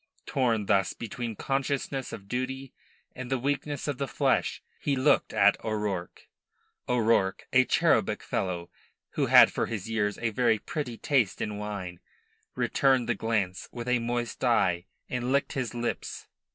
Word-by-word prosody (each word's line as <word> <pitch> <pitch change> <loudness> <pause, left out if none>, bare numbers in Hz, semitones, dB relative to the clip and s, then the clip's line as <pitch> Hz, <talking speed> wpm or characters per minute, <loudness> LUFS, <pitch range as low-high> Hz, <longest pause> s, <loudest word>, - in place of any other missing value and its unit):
Torn 115 -6 +1
thus 95 -1 +2
between 115 0 -5
consciousness 135 +1 -2
of 100 - -8
duty 130 +3 -4 0.4
and 130 -1 -6
the 135 - +1
weakness 140 +2 -2
of 145 -3 -2
the 140 - -1
flesh, - - 0 0.2
he 145 - 0
looked 135 +3 +3
at 100 +1 +4
O'Rourke. 105 -5 -3 0.6
O'Rourke, 115 -5 +2
a - - +6
cherubic - - +2
fellow, 85 -2 -3 0.4
who - - 0
had - - +8
for - - -1
his 110 -4 -4
years 105 -2 0
a 115 -1 -1
very 110 0 +3
pretty 125 0 -5
taste 130 -9 +1
in 105 -1 -3
wine, 95 -4 -5 0.6
returned 130 -3 +2
the - - +2
glance 105 -5 -2
with 120 0 -6
a 125 -1 +3
moist 120 +1 -3
eye, 95 -7 +2 0.2
and 125 0 -2
licked 140 0 +1
his 125 -3 -3
lips. 120 -3 -3
120 Hz, 150 wpm, -28 LUFS, 105-130 Hz, 0.6 s, had